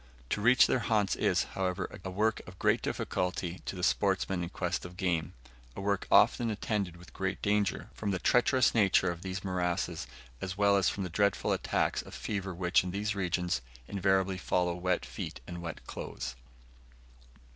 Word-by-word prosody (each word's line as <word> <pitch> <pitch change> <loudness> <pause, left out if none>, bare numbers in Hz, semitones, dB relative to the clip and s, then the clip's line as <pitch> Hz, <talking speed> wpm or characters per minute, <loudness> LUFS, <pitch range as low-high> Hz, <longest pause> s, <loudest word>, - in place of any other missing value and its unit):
To 105 - 0
reach 125 +4 +7
their - - +2
haunts 105 -4 +1
is, - - +2
however, 95 -1 -1 0.2
a 95 - -4
work 105 +4 +1
of 90 0 -11
great - - +2
difficulty 90 -1 -2
to - - -4
the 90 - -6
sportsman 95 -2 +1
in 85 - -3
quest 90 -1 -2
of 90 0 -9
game; 85 -5 0 0.4
a - - -6
work 100 -1 0
often 120 -1 +5
attended 100 -4 -2
with 85 +1 -15
great 95 -1 -2
danger, 105 -1 0
from 105 - -3
the 95 - +1
treacherous 125 +6 +3
nature 95 -4 +4
of 85 -1 -7
these 95 +1 -4
morasses, 90 -2 -1 0.3
as 95 0 -4
well 100 -1 +4
as 95 -2 +3
from 100 - -3
the 90 - -3
dreadful 100 +2 +1
attacks - - 0
of - - -11
fever 100 -3 -3
which, 90 0 +2
in 90 - -4
these 105 +3 -1
regions, 90 -7 0 0.3
invariably 95 -1 +1
follow 90 -1 +1
wet 90 +1 0
feet - - -6
and 85 +3 -7
wet 85 -2 -7
clothes. - - -6
95 Hz, 180 wpm, -31 LUFS, 90-100 Hz, 0.4 s, reach